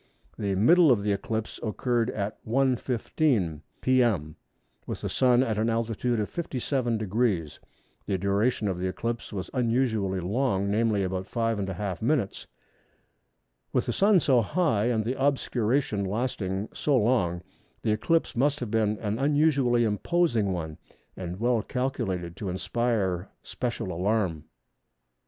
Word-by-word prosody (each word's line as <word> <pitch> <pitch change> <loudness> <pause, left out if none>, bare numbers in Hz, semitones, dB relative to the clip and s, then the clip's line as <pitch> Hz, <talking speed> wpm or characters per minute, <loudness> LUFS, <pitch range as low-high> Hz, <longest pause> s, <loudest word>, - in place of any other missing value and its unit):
The 100 -2 -1
middle 160 - +6
of 105 -5 +2
the 105 - +1
eclipse 110 +2 -3
occurred 120 +1 0
at 105 -1 -4
1h. 130 +1 +1
15m. 115 - 0 0.2
p.m. 115 - +2 0.5
with - - -5
the - - -3
Sun 125 -1 +4
at 110 -4 -1
an 110 +1 +1
altitude 115 +1 0
of 105 - -1
57°. 115 - -1 0.5
The 95 - 0
duration 100 +4 +1
of 95 -2 -2
the 95 - -1
eclipse 115 +5 -4
was 95 -4 -5
unusually 115 -6 +1
long, 100 +1 0
namely 110 -2 +2
about 95 0 -3
5½ 105 -5 -2
minutes. 120 -5 0 1.2
With - - +1
the - - -1
Sun 200 -2 +4
so 130 -5 +4
high 115 - +1
and 115 -3 +1
the 130 +3 -2
obscuration 125 -5 +1
lasting 100 -2 -2
so 145 -3 +1
long, 105 -7 +1 0.4
this 110 - +2
eclipse 165 +10 +1
must 140 +4 +2
have 120 -4 -4
been 110 -1 +1
an 105 +1 -2
unusually 140 -4 +3
imposing 115 - +1
one, 80 -3 -4 0.4
and 90 0 -6
well 120 0 +2
calculated 105 -10 -3
to 100 - -4
inspire 95 0 -1
special 120 -6 -3
alarm. 90 -3 0
110 Hz, 135 wpm, -27 LUFS, 100-125 Hz, 1.2 s, middle